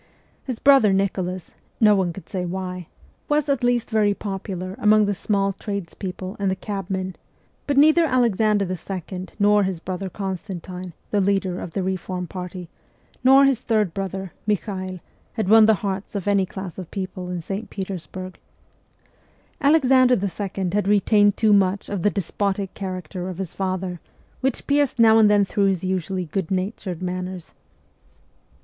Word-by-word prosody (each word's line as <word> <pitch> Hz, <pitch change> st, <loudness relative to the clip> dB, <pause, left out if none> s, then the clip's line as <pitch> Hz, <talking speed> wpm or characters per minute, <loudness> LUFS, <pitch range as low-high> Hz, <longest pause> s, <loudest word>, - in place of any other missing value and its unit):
His 255 Hz, -4 st, -3 dB
brother 270 Hz, -7 st, +5 dB
Nicholas 185 Hz, -2 st, -2 dB, 0.3 s
no 215 Hz, -2 st, +6 dB
one 185 Hz, -3 st, +1 dB
could 185 Hz, +3 st, -11 dB
say 185 Hz, -2 st, -3 dB
why 180 Hz, -1 st, -4 dB, 0.4 s
was 295 Hz, 0 st, +2 dB
at 275 Hz, -4 st, 0 dB
least 245 Hz, -1 st, +1 dB
very 210 Hz, -2 st, +3 dB
popular 190 Hz, -2 st, -5 dB
among 210 Hz, 0 st, +5 dB
the 205 Hz, -, 0 dB
small 195 Hz, 0 st, 0 dB
trades 200 Hz, -3 st, -5 dB
people 185 Hz, 0 st, -6 dB
and 200 Hz, -1 st, +1 dB
the 190 Hz, -, 0 dB
cabmen; 190 Hz, -1 st, -4 dB, 0.5 s
but 285 Hz, -1 st, 0 dB
neither 315 Hz, +3 st, +6 dB
Alexander 220 Hz, -6 st, +2 dB
II., 185 Hz, 0 st, -5 dB
nor 205 Hz, 0 st, +4 dB
his 190 Hz, -3 st, -1 dB
brother 185 Hz, +2 st, -4 dB
Constantine, 185 Hz, -1 st, -6 dB, 0.2 s
the 205 Hz, -, +2 dB
leader 190 Hz, -2 st, 0 dB
of 165 Hz, -, -7 dB
the 195 Hz, -, -1 dB
reform 185 Hz, -1 st, -3 dB
party, 180 Hz, 0 st, -7 dB, 0.6 s
nor 270 Hz, +2 st, +7 dB
his 270 Hz, -4 st, +3 dB
third 215 Hz, -8 st, 0 dB
brother, 190 Hz, -1 st, -4 dB
Michael, 185 Hz, -3 st, -2 dB, 0.3 s
had 220 Hz, -4 st, -2 dB
won 220 Hz, +1 st, +7 dB
the 220 Hz, -, +5 dB
hearts 195 Hz, +1 st, -3 dB
of 200 Hz, -1 st, -3 dB
any 200 Hz, -2 st, +3 dB
class 190 Hz, -1 st, -7 dB
of 180 Hz, -, -7 dB
people 185 Hz, -2 st, -5 dB
in 180 Hz, -1 st, -3 dB
St. 195 Hz, +6 st, -5 dB
Petersburg. 185 Hz, -1 st, -6 dB, 1.2 s
Alexander 265 Hz, -4 st, +5 dB
II. 195 Hz, -2 st, -3 dB
had 205 Hz, -1 st, +1 dB
retained 205 Hz, 0 st, +4 dB
too 220 Hz, -2 st, +4 dB
much 195 Hz, 0 st, +2 dB
of 200 Hz, -3 st, -2 dB
the 205 Hz, -, +3 dB
despotic 200 Hz, 0 st, -2 dB
character 185 Hz, -1 st, -5 dB
of 180 Hz, -, -6 dB
his 190 Hz, -3 st, -5 dB
father, 185 Hz, -2 st, -3 dB, 0.4 s
which 265 Hz, -1 st, -1 dB
pierced 285 Hz, -2 st, +2 dB
now 225 Hz, -1 st, +6 dB
and 215 Hz, -1 st, +6 dB
then 205 Hz, -1 st, +4 dB
through 200 Hz, +1 st, +1 dB
his 190 Hz, -3 st, +1 dB
usually 185 Hz, 0 st, -2 dB
good 170 Hz, +1 st, -3 dB
natured 185 Hz, -2 st, -3 dB
manners. 180 Hz, -1 st, -5 dB
195 Hz, 160 wpm, -23 LUFS, 185-210 Hz, 1.2 s, nor